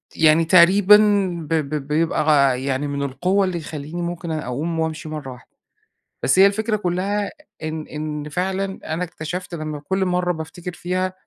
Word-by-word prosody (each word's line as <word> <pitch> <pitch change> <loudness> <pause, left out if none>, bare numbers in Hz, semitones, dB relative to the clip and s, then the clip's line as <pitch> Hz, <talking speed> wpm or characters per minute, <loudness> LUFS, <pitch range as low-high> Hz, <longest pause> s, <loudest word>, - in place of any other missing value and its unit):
يعني 160 +1 +4
تقريبًا 185 +4 +7 0.5
ب - - 0
ب 150 -2 -1
بيبقى 155 +1 +1
غ 140 -4 +4
يعني 135 +2 -2
من 140 0 -3
القوة 180 +9 +1
اللي 185 -2 -2
يخلّيني 155 +1 -6
ممكن 170 -1 -4
أ 155 -1 -3
أقوم 155 +7 -3
وأمشي 160 -1 -3
مرَّة 150 -4 -6
واحدة. 125 - -14 0.7
بس 135 - +2
هي 195 - +9
الفكرة 215 +2 0
كلَّها 200 +2 -1 0.3
إن 155 0 -4
إن 150 -1 -5
فعلًا 190 +4 -2 0.2
أنا 175 +3 -1
اكتشفت 175 +1 -6
لمّا 155 -2 -5
كُل 190 +6 -1
مرة 180 -1 0
بافتكر 170 +2 -7
فيها، 180 +1 -2
أ 185 - -6
165 Hz, 170 wpm, -21 LUFS, 150-185 Hz, 0.7 s, هي